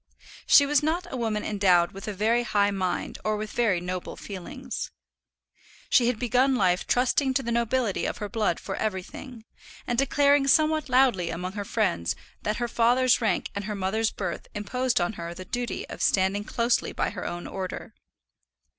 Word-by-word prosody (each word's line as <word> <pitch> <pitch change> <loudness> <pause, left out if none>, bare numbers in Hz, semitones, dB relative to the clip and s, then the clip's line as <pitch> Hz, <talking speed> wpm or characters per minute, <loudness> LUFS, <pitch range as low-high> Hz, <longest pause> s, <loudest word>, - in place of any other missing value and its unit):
She 285 - +7
was 290 0 +3
not 330 +4 0
a - - -2
woman 220 -4 -1
endowed 185 -4 +3
with 195 +1 -9
a 210 - -2
very 220 +5 +2
high 205 -3 +2
mind 185 -2 -2
or 215 0 0
with 215 0 -5
very 215 -7 +1
noble 180 +1 -5
feelings. 190 -4 -6 1.0
She 240 - +5
had 245 -2 +1
begun 255 +3 +2
life 180 -7 +1
trusting 260 +2 +2
to 270 - +1
the 235 - -3
nobility 235 -2 0
of - - -4
her 210 - -4
blood 205 -4 0
for 195 - -5
everything, 220 +4 -5 0.4
and 240 0 0
declaring 280 0 +3
somewhat 310 0 +3
loudly 250 -9 +3
among 180 +2 -4
her 205 +1 -4
friends 190 - 0 0.3
that 210 +1 -1
her 240 - -1
father's 245 +2 +3
rank 215 -5 0
and 200 -1 -4
her 210 0 -3
mother's 210 +3 0
birth - - -5
imposed 245 +4 0
on 175 +4 0
her 170 -3 -6
the 185 - -8
duty 245 +4 -4
of - - -8
standing 195 +2 +2
closely 235 +1 0
by - - -1
her 200 - -5
own 175 0 -5
order. 185 -1 -6
220 Hz, 180 wpm, -26 LUFS, 190-250 Hz, 1.0 s, She